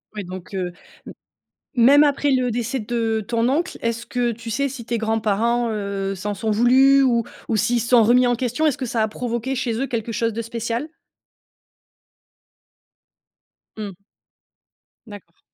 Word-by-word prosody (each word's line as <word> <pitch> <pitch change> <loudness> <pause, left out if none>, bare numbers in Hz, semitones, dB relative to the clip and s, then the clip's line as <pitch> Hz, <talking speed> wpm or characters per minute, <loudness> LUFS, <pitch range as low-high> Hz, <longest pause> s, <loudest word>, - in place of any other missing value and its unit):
Ouais 210 - -4
donc, 185 +1 -9
heu, 180 -1 -2 0.3
m - - -9 0.6
même 275 +5 +7
après 285 0 +1
le 255 -2 +2
décès 240 +2 -2
de 225 -1 -1
ton 230 0 +1
oncle, 320 +7 -1
est-ce 230 0 -2
que 245 -1 -1
tu 230 +1 -8
sais 280 +5 0
si 255 -3 -8
tes 235 0 -2
grands-parents, 225 +2 0
heu, 200 -2 -3
s'en 205 +2 -4
sont 215 +3 -2
voulus 260 +5 +5
ou 235 -4 +2 0.2
ou 225 - +1
s'ils 235 +3 +1
se 235 - -4
sont 240 -2 +6
remis 245 +3 +4
en 245 - +2
question? 250 +5 -1
Est-ce 295 - +2
que 265 - -3
ça 225 -1 0
a 220 - +1
provoqué, 240 +3 -3
chez 255 -2 -1
eux, 275 - 0
quelque 230 -2 -3
chose 230 +1 0
de 230 - -3
spécial? 230 +3 -3 2.9
Mmh. 205 -3 -6 1.1
D'accord. 205 -6 -13
235 Hz, 165 wpm, -22 LUFS, 220-250 Hz, 2.9 s, même